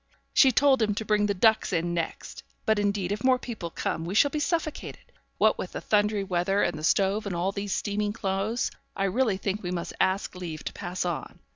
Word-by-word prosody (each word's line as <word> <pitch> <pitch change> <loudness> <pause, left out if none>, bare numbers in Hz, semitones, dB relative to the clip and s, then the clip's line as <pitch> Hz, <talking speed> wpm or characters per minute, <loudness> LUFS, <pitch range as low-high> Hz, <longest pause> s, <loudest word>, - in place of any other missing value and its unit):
'She 265 - +6
told 270 0 +4
him 210 -2 +1
to 220 - -3
bring 210 -1 +2
the 200 - +1
ducks 220 +3 +3
in 170 -1 0
next; 170 -1 -4 0.2
but 220 -1 +3
indeed 200 -2 0
if 210 +1 -3
more 260 -1 +5
people 225 -9 -6
come 165 - -3
we 175 +4 -4
shall 285 +6 +5
be 305 - -1
suffocated. 310 0 -3 0.3
What - - +3
with - - -5
the - - -3
thundery 210 -1 +2
weather, 190 +2 +1
and 175 - 0
the 155 - -7
stove, 200 +5 +2
and 185 - -3
all 180 +3 0
these 200 0 -3
steaming 205 0 -1
clothes, 205 +3 -1 0.2
I 195 - -1
really 200 +1 +1
think 200 +1 -2
we 180 - -4
must 175 -1 -4
ask 190 +2 +1
leave 170 -4 -6
to - - -5
pass 180 -1 -4
on. 175 -3 -4
200 Hz, 220 wpm, -27 LUFS, 180-220 Hz, 0.3 s, She